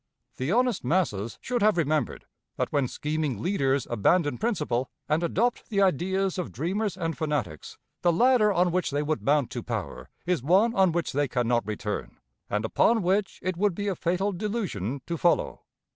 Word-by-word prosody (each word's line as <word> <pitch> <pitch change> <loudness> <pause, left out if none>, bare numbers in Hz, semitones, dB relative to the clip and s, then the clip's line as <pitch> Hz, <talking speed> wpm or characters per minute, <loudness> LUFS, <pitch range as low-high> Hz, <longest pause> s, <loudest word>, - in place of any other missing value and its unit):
The 130 +5 -1
honest 245 -1 +2
masses 120 - 0
should 245 -2 -2
have 210 -3 +4
remembered 155 -5 0 0.3
that - - -1
when 140 -3 +2
scheming 150 -4 -2
leaders 135 - +1
abandon 145 - +2
principle, 150 - -1 0.2
and 155 +2 +1
adopt 225 +8 0
the 205 -3 0
ideas 190 +2 +1
of 180 - -4
dreamers 195 +6 -2
and 165 -3 -2
fanatics, 150 - -3 0.2
the 175 - +4
ladder 230 +3 +4
on 180 -2 +2
which 180 0 0
they 145 +1 -1
would 155 +1 -1
mount 145 -2 +2
to - - -4
power - - -5 0.2
is 180 -5 0
one 190 - +3
on 190 -5 +4
which 170 0 -1
they 145 +1 +1
can 125 -2 -1
not 120 -3 +1
return, 105 -1 -4 0.3
and 105 +2 -1
upon 225 - +3
which 190 +1 +1
it 185 -1 -2
would 200 -1 +1
be 205 +2 -3
a 195 - 0
fatal 180 +5 0
delusion 175 - -3
to 170 - -3
follow. 175 - +1
170 Hz, 180 wpm, -27 LUFS, 140-195 Hz, 0.3 s, have